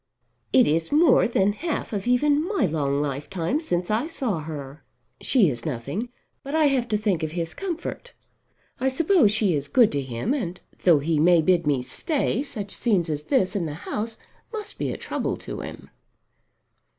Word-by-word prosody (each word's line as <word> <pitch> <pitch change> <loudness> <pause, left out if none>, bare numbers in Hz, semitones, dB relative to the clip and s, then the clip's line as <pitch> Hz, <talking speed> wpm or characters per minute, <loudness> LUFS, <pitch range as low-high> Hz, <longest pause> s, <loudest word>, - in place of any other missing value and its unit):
It 255 - +6
is 160 +2 0
more 300 -2 +5
than 205 -3 +2
half 310 +1 -3
of 200 +1 -3
even 285 +4 +3
my 405 - +1
long 145 -4 0
lifetime 160 - -2
since 180 - -2
I 230 +8 +1
saw 250 - -2
her. 145 -2 -7 0.4
She 235 -9 +4
is 120 -5 -3
nothing; 150 - -4 0.3
but 280 +2 -5
I 315 -1 +4
have 255 -3 +1
to 215 -2 +1
think 205 -5 0
of 155 0 -3
his 170 -1 -3
comfort. 385 +6 -5 0.7
I 265 - +2
suppose 300 - +3
she 215 -4 +2
is 145 -1 -2
good 235 - +4
to 140 - -1
him; 130 - -2
and 185 - -3 0.3
though 170 -4 +7
he 150 +2 0
may 170 +1 +5
bid 175 -2 +2
me 135 -4 +1
stay 280 - -1
such 215 -8 -5
scenes 185 -9 +1
as 150 -1 -2
this 210 -9 +1
in 175 -5 -1
the 145 - -5
house 220 +1 -3 0.3
must 435 -2 -6
be - - -1
a - - -4
trouble - - -3
to - - -7
him." - - -9
195 Hz, 185 wpm, -24 LUFS, 155-265 Hz, 0.7 s, though